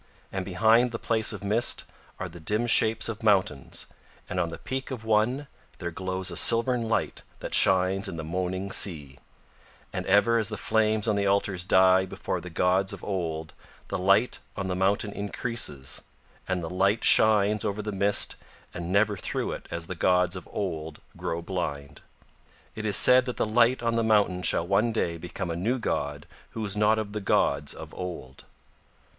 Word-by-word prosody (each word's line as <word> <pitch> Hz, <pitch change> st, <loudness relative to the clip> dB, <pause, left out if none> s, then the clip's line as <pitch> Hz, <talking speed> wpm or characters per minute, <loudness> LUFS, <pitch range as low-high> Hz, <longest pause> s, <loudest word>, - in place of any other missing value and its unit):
And 95 Hz, -1 st, -3 dB
behind 110 Hz, +6 st, +3 dB
the 115 Hz, -, -3 dB
place 110 Hz, -1 st, +1 dB
of 100 Hz, -3 st, -7 dB
mist 105 Hz, +4 st, +1 dB, 0.3 s
are -, -, -3 dB
the 85 Hz, -, -12 dB
dim 105 Hz, +8 st, 0 dB
shapes 110 Hz, -1 st, +3 dB
of 115 Hz, -1 st, -5 dB
mountains, 95 Hz, -, 0 dB, 0.4 s
and 90 Hz, -, -3 dB
on 85 Hz, -2 st, 0 dB
the 85 Hz, -, -7 dB
peak 130 Hz, +1 st, -5 dB
of 125 Hz, -5 st, -6 dB
one 110 Hz, +6 st, +1 dB, 0.3 s
there 85 Hz, -1 st, -5 dB
glows 95 Hz, +1 st, -3 dB
a -, -, -5 dB
silvern 115 Hz, 0 st, +3 dB
light -, -, -1 dB, 0.2 s
that -, -, -6 dB
shines 95 Hz, +1 st, +3 dB
in 85 Hz, -, -6 dB
the 80 Hz, -, -5 dB
moaning 95 Hz, +4 st, -3 dB
sea; 75 Hz, -10 st, +1 dB, 0.7 s
and -, -, -3 dB
ever 110 Hz, +4 st, +4 dB
as 110 Hz, -1 st, -1 dB
the 105 Hz, -, -5 dB
flames 110 Hz, +1 st, +1 dB
on 110 Hz, -, +2 dB
the 100 Hz, 0 st, 0 dB
altars 100 Hz, -2 st, 0 dB
die 95 Hz, 0 st, +4 dB
before -, -, -4 dB
the 90 Hz, -, -8 dB
gods 90 Hz, +3 st, +1 dB
of -, -, -10 dB
Old 80 Hz, -5 st, -4 dB, 0.4 s
the -, -, -2 dB
light 100 Hz, +6 st, +3 dB, 0.2 s
on 100 Hz, -, -3 dB
the 90 Hz, -1 st, -2 dB
mountain 100 Hz, +2 st, 0 dB
increases, 100 Hz, -, -3 dB, 0.5 s
and 95 Hz, -2 st, -2 dB
the -, -, -3 dB
light 100 Hz, +4 st, +1 dB
shines 105 Hz, -1 st, +4 dB
over 105 Hz, +1 st, -2 dB
the 105 Hz, -, -3 dB
mist 100 Hz, +1 st, +1 dB, 0.4 s
and 85 Hz, 0 st, -5 dB
never 105 Hz, +1 st, +3 dB
through 90 Hz, -, -3 dB
it -, -, -7 dB
as 85 Hz, 0 st, -4 dB
the 95 Hz, -, -5 dB
gods 90 Hz, +1 st, +2 dB
of 90 Hz, -, -9 dB
Old 80 Hz, -6 st, -4 dB, 0.2 s
grow 85 Hz, 0 st, -4 dB
blind. 75 Hz, -6 st, -5 dB, 0.7 s
It 110 Hz, 0 st, -4 dB
is 105 Hz, -, +4 dB
said 125 Hz, 0 st, +6 dB
that 125 Hz, -, -5 dB
the -, -, +1 dB
light 120 Hz, +3 st, +3 dB
on 115 Hz, 0 st, +1 dB
the 115 Hz, 0 st, +1 dB
mountain 105 Hz, -5 st, +2 dB
shall 85 Hz, -, +2 dB
one 100 Hz, +5 st, +2 dB
day 85 Hz, -7 st, -1 dB
become 85 Hz, +1 st, -5 dB
a -, -, -3 dB
new 110 Hz, +10 st, 0 dB
god 75 Hz, -, -3 dB, 0.3 s
who 110 Hz, -, -2 dB
is 100 Hz, 0 st, -3 dB
not 105 Hz, +1 st, +3 dB
of 105 Hz, -2 st, -4 dB
the 105 Hz, -, -3 dB
gods 70 Hz, -6 st, +1 dB
of -, -, -10 dB
Old. 85 Hz, -8 st, -7 dB
100 Hz, 185 wpm, -27 LUFS, 90-110 Hz, 0.7 s, said